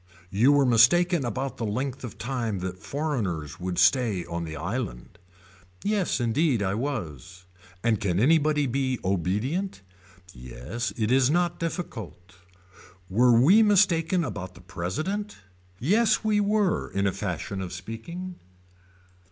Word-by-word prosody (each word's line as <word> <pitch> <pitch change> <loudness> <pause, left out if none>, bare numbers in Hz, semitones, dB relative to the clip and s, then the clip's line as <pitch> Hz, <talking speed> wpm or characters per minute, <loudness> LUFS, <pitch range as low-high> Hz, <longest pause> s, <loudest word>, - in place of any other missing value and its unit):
You 115 +8 +4
were 145 -1 +4
mistaken 150 +8 +4
about 130 +3 -3
the - - -4
length 130 +5 -3
of 120 - -7
time 115 -4 -2
that 95 0 -5
foreigners 110 - -3
would 90 -1 -3
stay 115 -9 +3
on 85 0 -4
the 80 -1 -6
island. 90 - -5 0.6
Yes 205 -7 0
indeed 120 0 +1
I 95 0 0
was. 90 - -5 0.4
And 115 -2 +2
can 90 -3 0
anybody 150 +2 +3
be 130 0 -1
obedient. 105 - -1 0.5
Yes 65 - -5
it 110 0 0
is 130 0 +4
not 175 +2 +1
difficult. 115 - -6 0.8
Were 120 +3 +5
we 185 - +6
mistaken 180 -4 +3
about 95 - -6
the 90 - -14
president. 95 - -4 0.4
Yes 210 - +2
we 215 -1 +2
were 205 -2 +1
in 100 0 -1
a 100 - +2
fashion 95 0 -4
of 90 -2 -5
speaking. 140 - -7
120 Hz, 135 wpm, -26 LUFS, -, 0.8 s, we